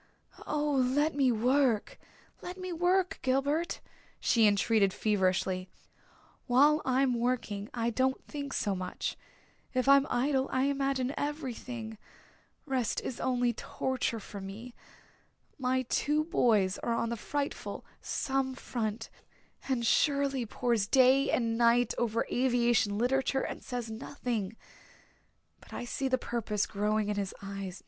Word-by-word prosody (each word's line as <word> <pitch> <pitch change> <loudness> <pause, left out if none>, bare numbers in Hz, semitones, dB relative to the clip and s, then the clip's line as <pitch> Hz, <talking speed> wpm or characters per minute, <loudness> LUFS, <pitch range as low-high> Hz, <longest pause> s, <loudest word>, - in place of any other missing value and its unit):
"Oh, 300 0 0
let 275 +3 +2
me 270 -3 +3
work 245 0 +1 0.4
let 360 +1 -7
me 370 -1 -5
work, 365 +3 +1
Gilbert," 285 +6 0 0.4
she 225 -3 +4
entreated 205 -1 +3
feverishly. 185 -2 0 0.8
"While 290 +5 +5
I'm 260 0 +2
working 230 -4 -1
I 235 -1 -1
don't 260 +3 +1
think 285 -2 -6
so 205 - 0
much. 185 -1 -4 0.6
If 255 +1 +1
I'm 275 0 +6
idle 265 +1 +1
I 260 - +1
imagine 275 -1 0
everything 250 -6 -5 0.7
rest 260 -6 0
is 255 - -5
only 245 -2 +1
torture 245 0 -2
for 200 -1 -9
me. 215 +6 -8 0.9
My 260 0 +1
two 295 +5 +1
boys 220 - +2
are 235 - -1
on 230 0 -1
the 235 - -1
frightful 285 +5 -4 0.2
Somme 265 -1 -1
front 225 -3 -4 0.6
and 245 -3 0
Shirley 275 -2 +2
pores 230 -2 0
day 265 +3 +5
and 230 -1 0
night 235 0 +4
over 230 -1 0
aviation 240 -4 +2
literature 265 +3 +1
and - - -5
says 245 -3 -4
nothing. 225 -3 -4 1.0
But - - -16
I - - -4
see 270 +3 -2
the 260 0 +2
purpose 225 -4 -2
growing 210 +1 0
in 205 - -1
his 195 -2 -3
eyes. 195 -2 -6
245 Hz, 130 wpm, -30 LUFS, 220-270 Hz, 1.0 s, I'm